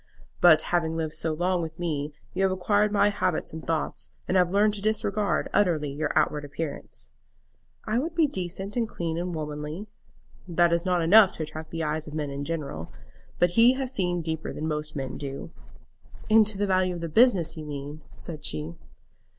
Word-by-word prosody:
"But 170 -3 +7
having 165 -2 +1
lived 160 -1 -2
so 160 - -1
long 175 +3 0
with 160 0 -6
me 155 -4 -2 0.2
you 185 - -1
have 190 -1 +3
acquired 205 +3 +2
my 205 0 +4
habits 185 -6 -1
and 160 - -7
thoughts, 165 -1 -2
and 185 - 0
have 180 -2 +4
learned 205 +3 +3
to 205 - -2
disregard 210 -1 0
utterly 160 -8 +2
your 145 +1 -2
outward 150 -1 +2
appearance." 145 +1 -5 0.7
"I 220 +3 +1
would 325 +5 -3
be 325 -2 +4
decent 190 - -4
and 230 -2 0
clean 165 -2 -3
and 175 0 -3
womanly." 150 +4 -5 0.6
"That 170 -1 +3
is 170 +1 0
not 180 -2 +2
enough 200 +3 +7
to 160 - -4
attract 155 +1 -7
the 165 -1 -3
eyes 155 +1 -2
of 150 - -7
men 150 -2 -2
in 140 +1 -4
general. 140 - -4 0.5
But 175 0 +3
he 230 +6 +6
has 260 -1 -3
seen 175 -5 0
deeper 160 -1 -3
than 155 - -4
most 150 0 -3
men 135 -3 -4
do." 140 +3 -6 0.8
"Into 215 -2 +5
the 205 - +1
value 185 -2 +1
of 170 - -6
the 170 - -2
business, 185 -3 +4
you 155 - -7
mean?" 145 +1 -6 0.2
said 155 -3 -7
she. 80 +2 -3
170 Hz, 190 wpm, -27 LUFS, 155-195 Hz, 0.8 s, But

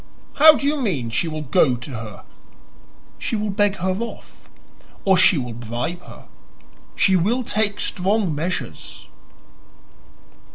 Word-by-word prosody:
"How 310 +1 +9
do 280 - -3
you 295 +2 +1
mean 140 - -2
she 140 +9 0
will 155 -1 -4
go 140 -2 +3
to 125 +4 -8
her?" 110 -4 -8 1.0
"She - - -2
will 210 -1 -2
beg 205 0 +1
her 185 0 -1
off, 235 0 -9 0.6
or 190 -1 +5
she 185 -1 +5
will 125 -3 -4
bribe 120 +9 -5
her. - - -14 0.7
She 190 - +3
will 220 +9 +1
take 210 -2 0
strong 195 -1 0
measures." 170 +5 -5
185 Hz, 135 wpm, -21 LUFS, 135-210 Hz, 1.0 s, How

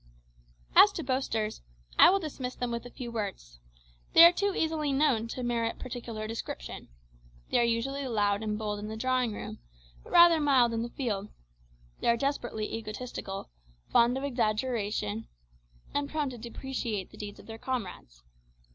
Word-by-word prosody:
As - - +9
to - - -4
boasters, 255 -5 -1 0.4
I - - +10
will 385 - +4
dismiss 275 -8 -5
them 245 -1 -3
with 235 +1 -4
a - - -11
few 240 -1 -7
words. 195 - -5 0.5
They 335 - +11
are 340 - +9
too 400 +2 0
easily 315 -2 0
known 270 -5 +2
to 250 +2 -5
merit 235 -1 -1
particular 235 -3 -6
description. 215 - -6 0.6
They - - +4
are - - +4
usually 260 +4 -1
loud 205 -3 +1
and 210 -1 -2
bold 210 -1 -3
in 210 - -6
the 220 +1 -5
drawing 255 0 +1
room, 205 - -7 0.4
but - - -14
rather 340 -1 +8
mild 260 -5 +4
in 225 - -1
the 235 - -3
field. 210 -6 -3 0.7
They - - -2
are 235 0 +4
desperately 240 -5 -2
egotistical, 215 - -6 0.4
fond 240 +2 +4
of 270 - -4
exaggeration, 215 - -1 0.7
and 285 0 -1
prone 300 -3 -1
to 245 - -8
depreciate 235 -4 -4
the - - -14
deeds 205 -1 -7
of - - -13
their 225 0 -9
comrades. 190 - -5
235 Hz, 165 wpm, -29 LUFS, 215-265 Hz, 0.7 s, They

